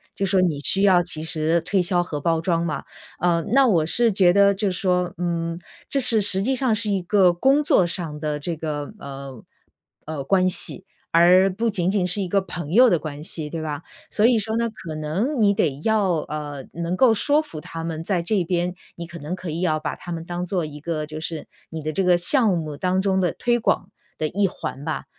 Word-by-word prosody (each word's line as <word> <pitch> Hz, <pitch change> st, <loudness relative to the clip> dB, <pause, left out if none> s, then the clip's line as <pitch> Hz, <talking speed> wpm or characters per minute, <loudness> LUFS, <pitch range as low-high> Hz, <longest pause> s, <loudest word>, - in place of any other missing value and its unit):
就 195 Hz, -, -1 dB
说 190 Hz, 0 st, +2 dB
你 165 Hz, -6 st, 0 dB
需 195 Hz, +6 st, +2 dB
要 185 Hz, -3 st, +5 dB
及 160 Hz, -3 st, -4 dB
时 160 Hz, +1 st, +1 dB
推 180 Hz, +3 st, 0 dB
销 175 Hz, 0 st, +2 dB
和 150 Hz, -4 st, -5 dB
包 165 Hz, +1 st, +1 dB
装 170 Hz, 0 st, 0 dB
嘛。 155 Hz, -, -3 dB, 0.4 s
呃， 170 Hz, -1 st, +1 dB
那 270 Hz, 0 st, +5 dB
我 170 Hz, -9 st, +2 dB
是 230 Hz, +6 st, +2 dB
觉 185 Hz, -2 st, +4 dB
得 200 Hz, +1 st, +4 dB
就 200 Hz, 0 st, -1 dB
说， 180 Hz, -1 st, 0 dB
嗯， 170 Hz, -1 st, -3 dB, 0.3 s
这 275 Hz, -, +1 dB
是 230 Hz, -4 st, +2 dB
实 195 Hz, -1 st, +4 dB
际 260 Hz, +6 st, 0 dB
上 255 Hz, -3 st, +1 dB
是 215 Hz, 0 st, +2 dB
一 195 Hz, -2 st, 0 dB
个 180 Hz, 0 st, +3 dB
工 270 Hz, +11 st, +3 dB
作 195 Hz, -10 st, +3 dB
上 170 Hz, -3 st, 0 dB
的 150 Hz, -1 st, -2 dB
这 165 Hz, +3 st, -4 dB
个， 150 Hz, 0 st, -5 dB
呃 135 Hz, -3 st, -9 dB, 0.6 s
呃， 150 Hz, -3 st, -5 dB
关 185 Hz, +4 st, +2 dB
系， 185 Hz, -, +4 dB, 0.3 s
而 180 Hz, +3 st, +5 dB
不 225 Hz, +4 st, -1 dB
仅 185 Hz, -3 st, 0 dB
仅 195 Hz, -3 st, 0 dB
是 180 Hz, +3 st, +1 dB
一 185 Hz, -, -3 dB
个 200 Hz, -, +2 dB
朋 175 Hz, -5 st, -6 dB
友 245 Hz, +6 st, +6 dB
的 175 Hz, -, +3 dB
关 150 Hz, -1 st, -7 dB
系 160 Hz, -5 st, -1 dB
对 165 Hz, 0 st, -5 dB
吧？ 150 Hz, -1 st, -4 dB, 0.3 s
所 210 Hz, -, +1 dB
以 235 Hz, -1 st, +4 dB
说 220 Hz, +1 st, -3 dB
呢， 230 Hz, 0 st, 0 dB
可 170 Hz, -8 st, -9 dB
能 190 Hz, -, -2 dB
你 200 Hz, -1 st, +4 dB
得 145 Hz, -7 st, -1 dB
要， 215 Hz, -3 st, +2 dB
呃， 150 Hz, -3 st, -5 dB
能 170 Hz, +1 st, -3 dB
够 235 Hz, +3 st, +4 dB
说 290 Hz, +7 st, +2 dB
服 170 Hz, -, -9 dB
他 165 Hz, +2 st, -8 dB
们 165 Hz, -1 st, -4 dB
在 175 Hz, +1 st, -1 dB
这 185 Hz, +1 st, 0 dB
边， 175 Hz, +1 st, -1 dB, 0.2 s
你 170 Hz, -, -7 dB
可 170 Hz, 0 st, -10 dB
能 155 Hz, +5 st, -5 dB
可 185 Hz, -2 st, -7 dB
以 160 Hz, -, -4 dB
要 155 Hz, -4 st, 0 dB
把 -, -, -4 dB
他 175 Hz, -, -7 dB
们 165 Hz, -1 st, -5 dB
当 175 Hz, +1 st, -4 dB
做 180 Hz, -1 st, -2 dB
一 150 Hz, -1 st, -9 dB
个 155 Hz, 0 st, -3 dB
就 155 Hz, 0 st, -8 dB
是 160 Hz, -1 st, -5 dB, 0.2 s
你 160 Hz, -, -6 dB
的 155 Hz, -, -2 dB
这 190 Hz, +5 st, -1 dB
个 180 Hz, -1 st, +4 dB
项 230 Hz, +7 st, +3 dB
目 155 Hz, -3 st, -5 dB
当 185 Hz, +3 st, 0 dB
中 190 Hz, -1 st, +1 dB
的 180 Hz, -2 st, 0 dB
推 240 Hz, 0 st, 0 dB
广 -, -, 0 dB, 0.3 s
的 155 Hz, -, 0 dB
一 200 Hz, +4 st, +1 dB
环 145 Hz, -5 st, -7 dB
吧， 160 Hz, -, -4 dB
175 Hz, 245 characters per minute, -22 LUFS, 160-200 Hz, 0.6 s, 友